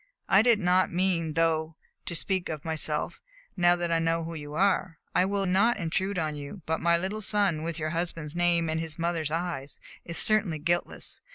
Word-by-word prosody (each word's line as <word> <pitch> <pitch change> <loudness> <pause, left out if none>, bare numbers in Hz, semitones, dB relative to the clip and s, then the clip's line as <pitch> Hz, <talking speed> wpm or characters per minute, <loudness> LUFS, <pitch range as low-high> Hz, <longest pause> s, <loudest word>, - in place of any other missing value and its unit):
I 195 +1 +6
did 235 -1 +4
not 185 -1 +2
mean, 170 -3 0
though, 160 0 +1 0.3
to 170 - -2
speak 185 +1 +1
of 155 -3 -5
myself, 155 -1 -2 0.3
now 175 -1 +4
that 175 -1 -2
I 165 - +2
know 165 0 0
who 165 +1 -6
you 150 -2 -7
are. 185 -2 +1 0.2
I 180 - +3
will 200 0 0
not 200 +6 +3
intrude 190 +2 -1
on 155 -3 -1
you; 145 +5 -8
but 160 0 -1
my 170 0 +3
little 190 +5 -4
son, 200 -6 +2
with 165 0 -3
your 155 -1 -2
husband's 165 -2 -4
name 175 -1 +2
and 160 0 -1
his 160 -2 -5
mother's 165 -2 -1
eyes, 165 -4 -4 0.2
is 170 - -3
certainly 215 -7 +3
guiltless. 170 +3 -2
170 Hz, 195 wpm, -27 LUFS, 160-185 Hz, 0.3 s, I